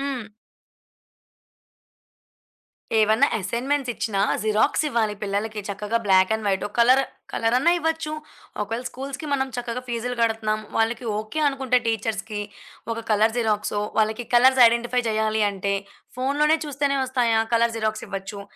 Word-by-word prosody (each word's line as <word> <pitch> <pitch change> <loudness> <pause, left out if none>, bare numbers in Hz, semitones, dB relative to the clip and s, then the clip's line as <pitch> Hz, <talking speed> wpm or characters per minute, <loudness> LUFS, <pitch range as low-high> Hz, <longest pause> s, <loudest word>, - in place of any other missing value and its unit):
హ్మ్. 270 -5 -3 2.7
ఏవన్నా 220 +6 +4
అసైన్‌మెంట్సిచ్చినా 240 -1 -1 0.2
జిరాక్సివ్వాలి 220 +1 +1
పిల్లలకి 210 +2 -2
చక్కగా 210 +3 -2
black 190 +1 +4
and 220 -1 -6
white, 190 -1 0
oh - - -20
colour 255 +3 +5 0.3
కలరన్న 250 +8 +2
ఇవ్వచ్చు. 320 -1 -1 0.5
ఒకేళ 225 +4 -3
స్కూల్స్‌కి 275 +3 -7
మనం 265 -1 +1
చక్కగా 245 0 -3
ఫీజులు 245 +1 -3
గడతన్నాం. 220 -1 0 0.2
వాళ్లకి 230 +2 0
ఓకే. 215 +8 -4
అనుకుంటే 265 -2 +1
టీచర్స్‌కి, 220 -1 -2 0.5
ఒక 230 0 -6
కలరు 220 +2 +3
జిరాక్సో, 210 -2 0 0.2
వాళ్లకి 220 +2 0
కలర్స్ 260 +1 +6
ఐడెంటిఫై 240 +2 0
జేయాలి 220 0 +1
అంటే, 200 0 -2 0.4
ఫోనులోనే 295 +4 +2
చూస్తేనే 280 -1 0
వస్తాయా? 240 -3 +1
కలరు 230 0 +3
జిరాక్సివ్వచ్చు. 205 -2 -4
230 Hz, 115 wpm, -24 LUFS, 215-255 Hz, 2.7 s, కలర్స్